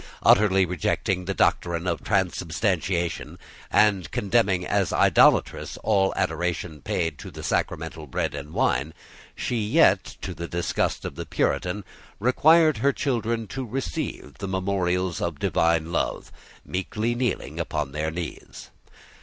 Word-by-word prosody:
Utterly 95 -2 +5
rejecting 90 +1 -1
the 100 +1 -2
doctrine 85 0 +1
of 85 -3 -2
transubstantiation, 90 - -1 0.3
and 100 -4 +3
condemning 100 -4 +1
as 100 -1 +1
idolatrous - - +3
all 95 -3 +3
adoration 85 -3 -2
paid 80 -2 -2
to - - -8
the - - -9
sacramental 80 -1 -2
bread - - -2
and 75 +2 -7
wine, 70 +1 0 0.4
she 120 - -2
yet, 105 - +4 0.2
to - - -4
the 85 +1 -6
disgust 85 0 -1
of - - -4
the - - -7
Puritan, 90 +8 -1 0.4
required 155 +7 +5
her 140 - +3
children 115 -4 -1
to 135 0 -4
receive 105 - -5
the 100 - -4
memorials 95 -2 -1
of 85 -4 -2
divine 85 +2 +1
love, - - -2 0.3
meekly 105 +5 -2
kneeling 120 - -2
upon 75 -4 -2
their 75 +2 -2
knees. 85 +1 -7
90 Hz, 130 wpm, -25 LUFS, 85-105 Hz, 0.4 s, Utterly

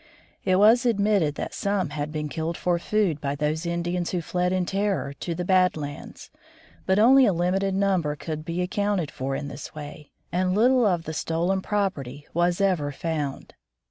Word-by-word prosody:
It 185 - +2
was 220 +5 +6
admitted 200 -9 +2
that - - -5
some 200 -6 -1
had 150 0 -3
been 150 -1 -3
killed 160 +2 -3
for 175 -1 0
food 185 -6 0
by 140 0 -2
those 155 +3 -1
Indians 175 +1 -1
who 180 - -1
fled 180 +1 0
in 185 -1 +1
terror 190 -9 -1
to 170 - -3
the 180 +1 -3
"Bad 185 -2 +3
Lands," 145 -1 -8 0.6
but 190 0 +3
only 255 +4 +6
a - - +4
limited 190 +3 0
number 190 -7 +1
could 155 +1 -5
be 170 +2 -2
accounted 195 -3 -1
for 135 +1 -3
in 140 - -4
this 140 +2 -8
way, 150 -1 -9 0.2
and 185 +2 +1
little 245 +2 +4
of 175 -4 +1
the 155 - -5
stolen 170 +5 0
property 150 -10 -2
was 175 +1 +1
ever 180 -7 +1
found. 150 -2 -4
175 Hz, 180 wpm, -25 LUFS, 150-195 Hz, 0.6 s, was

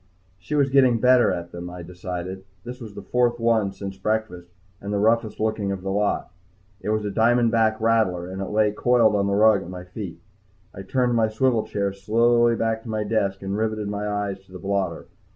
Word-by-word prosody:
She 150 +11 -4
was 140 -2 +2
getting 130 -4 +4
better 125 +1 +5
at 85 0 -5
them, 85 0 -7
I 90 0 -8
decided. 90 +1 -6 0.2
This 125 +1 -8
was 110 -3 -9
the - - -8
fourth 120 -1 +1
one 115 -4 +2
since 95 0 -8
breakfast 105 -4 -2 0.3
and 100 - -5
the 105 - 0
roughest 110 +1 +1
looking 110 -2 -1
of 95 -1 -5
the 95 - -2
lot. 105 -1 -1 0.5
It 105 - -5
was 110 -1 0
a 105 - -2
diamondback 115 0 +3
rattler, 110 -6 +1
and 95 +1 -5
lay 105 0 +2
coiled 115 0 +3
on 100 -1 +1
the 100 - +1
rug 105 -1 +5
at 85 - -9
my 90 -1 -7
feet. 90 0 -8 0.5
I 95 - -8
turned 125 +5 0
my 115 -2 +3
swivel 115 +1 +1
chair 100 -1 -2
slowly 115 +4 +3
back 115 0 -1
to 115 - -10
my 110 -1 -1
desk 100 -2 -1
and 95 +1 -3
riveted 110 -1 -2
my 105 0 -3
eyes 100 -2 -3
to 95 - -23
the 90 - -8
blotter. 95 -3 -2
105 Hz, 205 wpm, -23 LUFS, 95-115 Hz, 0.5 s, better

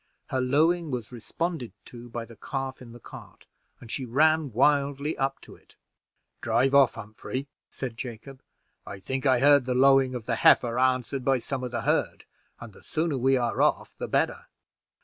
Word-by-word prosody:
Her 130 - -1
lowing 160 +6 +2
was 125 -4 -5
responded 130 +3 -4
to 120 0 -12
by 115 0 -5
the 115 0 -14
calf 135 +3 -5
in 120 -2 -11
the 120 - -12
cart, - - -13 0.3
and 115 - -11
she 135 - -3
ran 155 +4 +2
wildly 140 +4 +1
up 135 0 -2
to - - -14
it. - - -24 0.7
"Drive 120 +4 +1
off, 140 -3 +5
Humphrey," 115 +5 -6 0.2
said 125 -4 -6
Jacob; 130 +2 -8 0.4
"I 100 - -8
think 130 +8 -3
I 130 -2 +4
heard 145 -2 +5
the 125 -1 -1
lowing 135 0 +4
of 120 -3 -6
the 115 -2 -1
heifer 120 0 +4
answered 130 +1 0
by 135 +1 +2
some 130 +1 -5
of 125 - -3
the 120 -1 -3
herd, - - -1 0.3
and 115 -3 -10
the - - -17
sooner 155 -4 -2
we 135 +2 +3
are 120 -2 -1
off - - +1
the - - -4
better." - - -1
130 Hz, 185 wpm, -26 LUFS, 120-140 Hz, 0.7 s, off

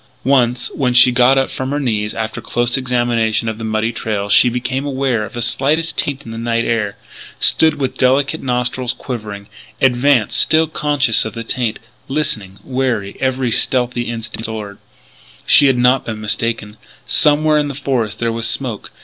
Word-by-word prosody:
Once 125 -2 +2
when 125 -3 0
she 125 +1 +7
got 125 +2 +4
up 135 - +1
from 130 0 -4
her 145 +1 -1
knees 110 -6 -2
after 110 -1 -4
close 120 0 0
examination 120 -4 0
of 110 0 -3
the - - -6
muddy 110 +1 -1
trail, 105 -3 -3
she 120 - +6
became 125 +2 -2
aware 135 -5 -1
of 105 - -8
the 120 -1 -3
slightest 150 +6 0
taint 140 -1 -3
in 115 - -8
the 115 - -6
night 115 0 -1
air 105 -3 -1 0.4
stood 160 -1 +4
with 135 -3 -4
delicate 135 +4 +2
nostrils 125 0 -1
quivering 105 -7 -7 0.3
advanced, 125 -3 +2
still 160 +1 +3
conscious 145 -6 +1
of 110 - -6
the 115 - -5
taint, 115 -1 -2 0.3
listening, 110 -10 -2
wary, 125 -7 -2
every 130 -2 0
stealthy 120 -1 0
instinct 115 -1 -5
alert. 105 -3 -7 0.7
She 145 - +6
had 130 -2 +2
not 125 +2 +2
been 110 -2 -4
mistaken: 110 0 -2 0.3
somewhere 150 0 +3
in 150 - 0
the 140 - -6
forest 120 -7 -2
there 115 -1 -1
was 115 0 -2
smoke. 115 -2 -3
125 Hz, 175 wpm, -17 LUFS, 110-135 Hz, 0.7 s, she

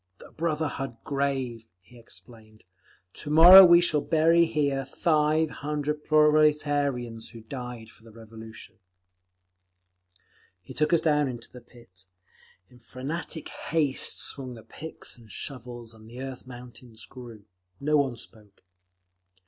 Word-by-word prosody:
"The - - -15
Brotherhood 150 -6 -3
Grave," 135 -5 -3
he 120 +7 -19
explained. 110 -2 -14 0.5
"To 150 - -9
morrow 175 +5 +10
we 175 -1 +7
shall 155 -4 +1
bury 165 +2 +3
here 145 -4 -1
five 155 +2 +1
hundred 150 0 -3
proletarians 145 -6 +1
who 115 - -12
died 125 -1 -8
for - - -23
the 115 - -15
Revolution." 110 0 -13 1.8
He - - -11
took 150 0 0
us 170 - +3
down 150 -2 +2
into 120 -2 -8
the 125 - -12
pit. 95 -6 -19 0.6
In 125 - -20
frantic 145 +7 -6
haste 150 -4 -1
swung 130 -3 -4
the 110 - -13
picks 160 -5 -9
and 110 -3 -17
shovels, 120 -3 -8
and 110 0 -16
the 120 +2 -11
earth—mountains 125 -3 -10
grew. 120 -5 -12 0.3
No 150 +2 +1
one 135 -4 0
spoke. 105 -3 -15
130 Hz, 125 wpm, -26 LUFS, 115-150 Hz, 1.8 s, morrow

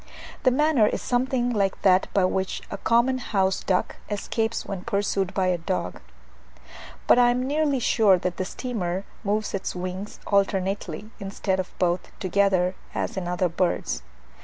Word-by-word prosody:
The 255 - +5
manner 270 -4 +3
is - - -1
something 245 0 0
like 200 -4 0
that 185 -1 +5
by 195 -2 +3
which 190 +1 -1
the - - -3
common 245 +3 +2
house 190 -5 0
duck 185 -1 0
escapes 220 +2 -2
when 190 -2 -5
pursued 200 -3 0
by 190 - +2
a 180 -1 +1
dog; 165 - -3 1.1
but - - +6
I 245 0 +6
am 250 +1 +1
nearly 290 0 +1
sure 220 -5 +4
that 180 0 -3
the 185 - -1
steamer 190 -6 -3 0.2
moves 210 +1 -1
its 195 -1 -3
wings 185 +3 -5
alternately, 195 -1 0
instead 195 -1 -2
of 185 - -2
both 175 0 0
together, 185 -1 +2 0.2
as - - -2
in 185 -2 -3
other 180 +1 +1
birds. 175 +1 -1
195 Hz, 160 wpm, -25 LUFS, 185-230 Hz, 1.1 s, but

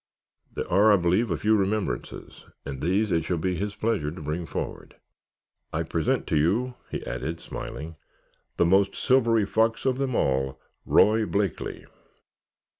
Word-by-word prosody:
"There - - -3
are, 105 +4 +5
I - - +7
believe, 95 +5 +2
a 85 - 0
few 110 +1 +3
remembrances 100 - -3 0.2
and 70 -2 -6
these 95 +6 +1
it 80 -2 +2
shall 85 +2 -1
be 90 +3 -1
his 105 +3 -3
pleasure 110 -11 0
to 80 - -8
bring 80 +3 -3
forward. - - -6 0.8
I - - -1
present - - 0
to 80 - 0
you," 110 +12 +1 0.2
he - - -5
added, 80 +1 -4
smiling, 80 +1 -7 0.6
"the - - +4
most 95 +3 +3
silvery 115 -5 +3
fox 115 +4 +1
of 130 0 +1
them 135 -3 -1
all, 65 0 0 0.3
Roy 110 0 +4
Blakeley." 100 -3 -2
95 Hz, 155 wpm, -26 LUFS, 80-110 Hz, 0.8 s, I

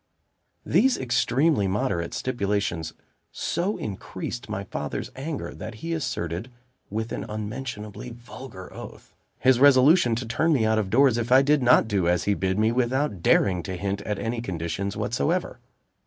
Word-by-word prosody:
These 265 -1 +3
extremely 130 -1 +2
moderate 95 -4 -1
stipulations 100 -9 -1 0.4
so 185 +5 -1
increased 95 - -6
my - - -3
father's - - -5
anger, 145 +3 -5
that 110 - -8
he 165 +9 -4
asserted, 115 - -3 0.4
with 110 +2 -3
an - - -3
unmentionably 105 +1 -5
vulgar 120 -4 -10
oath, - - -11 0.2
his 130 -1 +4
resolution 140 -1 +6
to 120 +2 -3
turn 155 +8 +1
me 120 -6 +2
out 110 0 +2
of 100 -3 -2
doors 125 +1 +4
if 120 +1 -3
I 130 +1 +7
did 145 +1 +3
not 125 -2 +5
do 100 -5 +1
as 90 0 +2
he 100 - +2
bid 95 -1 -1
me, 110 +1 +3
without 125 - 0
daring 90 0 +3
to 95 +2 -5
hint 100 +2 -2
at 105 0 -3
any 115 +3 -2
conditions 95 0 -3
whatsoever. 70 - -1
115 Hz, 155 wpm, -25 LUFS, 100-130 Hz, 0.4 s, I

